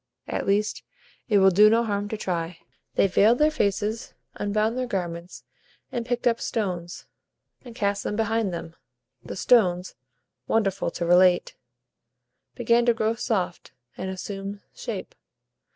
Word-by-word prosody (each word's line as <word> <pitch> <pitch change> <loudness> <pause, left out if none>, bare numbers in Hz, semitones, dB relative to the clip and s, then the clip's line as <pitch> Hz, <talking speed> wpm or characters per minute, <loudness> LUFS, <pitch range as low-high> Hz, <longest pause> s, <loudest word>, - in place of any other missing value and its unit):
At - - -3
least, 205 +2 +1 0.5
it 210 - +4
will 190 -1 +6
do 210 +4 +7
no 230 +2 +3
harm 205 -2 -2
to 220 - -3
try." 170 -4 -3 0.4
They - - +4
veiled 205 +5 +4
their 305 +2 +4
faces, 215 -4 -1 0.2
unbound 215 +2 0
their 255 0 -2
garments, 175 -4 -4 0.5
and 235 -1 -3
picked 245 0 -2
up 235 -1 +2
stones, 180 -6 -3 0.6
and 240 -3 -11
cast 200 -3 -1
them 210 - -2
behind 225 -2 0
them. 165 -1 -6 0.5
The - - -7
stones 185 -5 +3 0.5
(wonderful 195 -5 +1
to 170 0 -4
relate) 180 +1 +4 1.0
began 235 0 +2
to 235 - +4
grow 220 0 +1
soft, 185 - -2 0.2
and 190 - -5
assume 195 +1 -6
shape. - - -6
205 Hz, 140 wpm, -25 LUFS, 185-230 Hz, 1.0 s, do